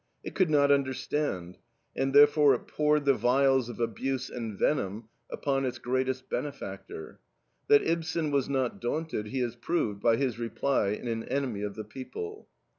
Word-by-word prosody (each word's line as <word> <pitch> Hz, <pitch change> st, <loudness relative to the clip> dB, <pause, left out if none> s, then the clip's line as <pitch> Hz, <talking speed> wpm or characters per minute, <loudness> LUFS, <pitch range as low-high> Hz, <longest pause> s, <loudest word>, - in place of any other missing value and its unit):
It -, -, -6 dB
could 185 Hz, -4 st, +2 dB
not 145 Hz, -2 st, +4 dB
understand, 130 Hz, -, -1 dB, 0.4 s
and 135 Hz, -, 0 dB
therefore 145 Hz, 0 st, +6 dB
it -, -, -7 dB
poured 150 Hz, -1 st, +1 dB
the 140 Hz, -, +5 dB
vials 130 Hz, +1 st, +3 dB
of 120 Hz, -, -8 dB
abuse 125 Hz, +3 st, -2 dB
and 115 Hz, -4 st, -5 dB
venom 110 Hz, -5 st, -1 dB, 0.2 s
upon 135 Hz, -1 st, -1 dB
its 130 Hz, -1 st, -2 dB
greatest 130 Hz, +1 st, -1 dB
benefactor. 110 Hz, -, -6 dB, 0.5 s
That 145 Hz, -, +6 dB
Ibsen 165 Hz, -1 st, -1 dB
was 140 Hz, -2 st, +1 dB
not 130 Hz, -7 st, -1 dB
daunted 135 Hz, -3 st, -2 dB
he 130 Hz, +4 st, -2 dB
has 120 Hz, -2 st, -2 dB
proved 120 Hz, -6 st, -1 dB
by 115 Hz, +1 st, +4 dB
his 125 Hz, -2 st, -1 dB
reply 120 Hz, +1 st, 0 dB
in 105 Hz, +4 st, -3 dB
AN 115 Hz, -1 st, -2 dB
ENEMY 130 Hz, -6 st, -2 dB
OF 105 Hz, -1 st, -4 dB
THE 110 Hz, -, -5 dB
PEOPLE. 425 Hz, -, -8 dB
130 Hz, 165 wpm, -29 LUFS, 115-145 Hz, 0.5 s, therefore